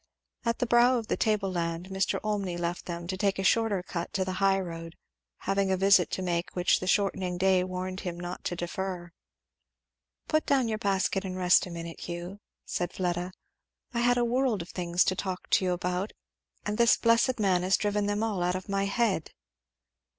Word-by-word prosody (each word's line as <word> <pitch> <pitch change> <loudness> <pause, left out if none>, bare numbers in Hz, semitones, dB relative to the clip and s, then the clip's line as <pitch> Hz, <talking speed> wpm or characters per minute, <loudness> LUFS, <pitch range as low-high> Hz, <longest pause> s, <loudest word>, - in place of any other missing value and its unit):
At 230 0 +1
the - - 0
brow 240 +2 +5
of 225 -2 -5
the - - +2
table 210 -3 +1
land 170 +1 -3
Mr. 190 0 0
Olmney 200 -4 -1
left 175 0 -3
them 170 -1 -5
to 185 +2 -3
take 195 0 0
a 195 - -2
shorter 205 -2 +2
cut 170 -2 -5
to 190 -1 0
the 185 - -2
high 195 0 +4
road, 165 -2 -6 0.5
having 195 0 0
a 190 - +2
visit 195 -1 +5
to 190 - -2
make 175 -1 -2
which 180 -1 +3
the 185 - -5
shortening 185 -2 +1
day 190 0 +3
warned 185 0 -4
him 175 -2 -5
not 175 +1 -6
to 175 - -1
defer. 175 0 -4 1.2
"Put 310 0 +1
down 265 -4 +3
your 215 -1 -2
basket 195 -1 0
and 185 -1 -5
rest 180 0 +4
a - - -8
minute, 170 -1 -7
Hugh," 175 +3 -6 0.3
said 175 - -2
Fleda. 180 0 -2 0.6
"I 235 - 0
had 245 +1 +3
a 240 - +2
world 240 -5 +1
of 170 - -15
things 175 -1 +1
to 185 - 0
talk 185 -1 -4
to 190 - +4
you 180 - +1
about, 180 +3 -2 0.5
and 210 +1 -2
this 235 0 +6
blessed 230 +2 +3
man 190 -4 +3
has 185 +1 +3
driven 205 -1 0
them 205 +1 0
all 210 -5 -1
out 180 +1 +1
of 185 - -5
my 195 0 0
head." 200 -5 0
190 Hz, 200 wpm, -28 LUFS, 180-205 Hz, 1.2 s, this